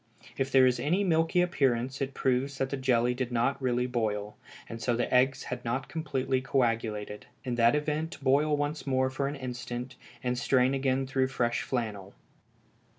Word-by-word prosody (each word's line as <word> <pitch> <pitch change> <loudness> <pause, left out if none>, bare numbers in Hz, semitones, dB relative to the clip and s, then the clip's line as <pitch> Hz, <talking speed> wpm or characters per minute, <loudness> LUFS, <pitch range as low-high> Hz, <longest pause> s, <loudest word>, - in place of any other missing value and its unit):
If 135 0 -2
there 130 -1 +6
is 125 -1 +2
any 165 +10 +1
milky 165 -1 +2
appearance 135 -6 0
it 135 0 -2
proves 135 +1 0
that 135 0 -1
the - - 0
jelly 125 -2 +2
did 125 0 -3
not 120 +4 0
really 125 -1 +1
boil, 105 -4 -2 0.3
and 115 0 -7
so 120 0 +1
the 120 - -1
eggs 130 +2 +3
had 125 0 -5
not 130 +3 -2
completely 135 -5 -1
coagulated; 115 -5 -1 0.2
in 125 -3 -3
that 120 +3 +4
event 155 +2 -2
boil 145 +2 +2
once 145 +1 -3
more 130 -1 +1
for 140 +1 -1
an 145 - -3
instant, 125 -1 -6 0.3
and 125 -1 -1
strain 130 +1 +3
again 135 0 +1
through 130 0 +1
fresh 120 -2 0
flannel. 105 -6 -4
130 Hz, 175 wpm, -29 LUFS, 120-140 Hz, 0.3 s, there